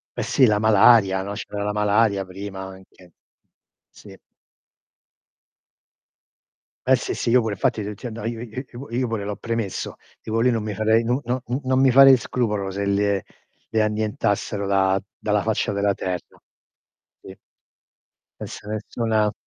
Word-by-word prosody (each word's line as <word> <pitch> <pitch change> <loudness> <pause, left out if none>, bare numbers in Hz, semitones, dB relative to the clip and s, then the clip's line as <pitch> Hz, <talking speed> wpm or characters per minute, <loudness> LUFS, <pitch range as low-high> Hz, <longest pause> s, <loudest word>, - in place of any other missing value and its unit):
Eh - - -2
sì, 130 - +3
la 105 -1 +3
malaria, 105 -2 +5
no, 100 +1 -5
c'era 105 0 -6
la 105 - -1
malaria 105 -1 +2
prima 95 +1 -8
anche. 95 -1 -13 0.8
Sì. - - -15 2.7
Eh - - +5
sì, - - -3
sì, 115 - -1
io 125 +1 +5
pure, 110 -3 -2
fatti 105 - 0
t 105 +1 -5
ti 125 - -7
io 115 -2 -7 0.2
io 120 +2 -6
io 130 +3 -9
io 125 +1 0
pure 110 -3 -3
l'ho 105 0 -3
premesso. 115 -2 -4 0.3
Dico 110 +1 -2
lì 125 +2 +3
non 115 -2 -1
mi 105 -1 -4
farei 110 +3 +2
non 120 +3 0
non 125 +2 0
u 125 +3 -1
non 130 0 +2
mi 135 -1 +5
farei 135 +1 +8
scrupolo 105 -5 -2
se 100 +1 -3
le 100 -1 +1 0.5
le 110 - +1
annientassero 105 -1 -1
da 95 -1 +2 0.2
dalla 105 -1 0
faccia 110 -1 -1
della 100 0 +1
terra. 90 -3 -5 0.8
Sì. 95 - -12 1.0
E - - -4
se - - -10
nessuna 110 0 -1
105 Hz, 155 wpm, -23 LUFS, 100-115 Hz, 2.7 s, farei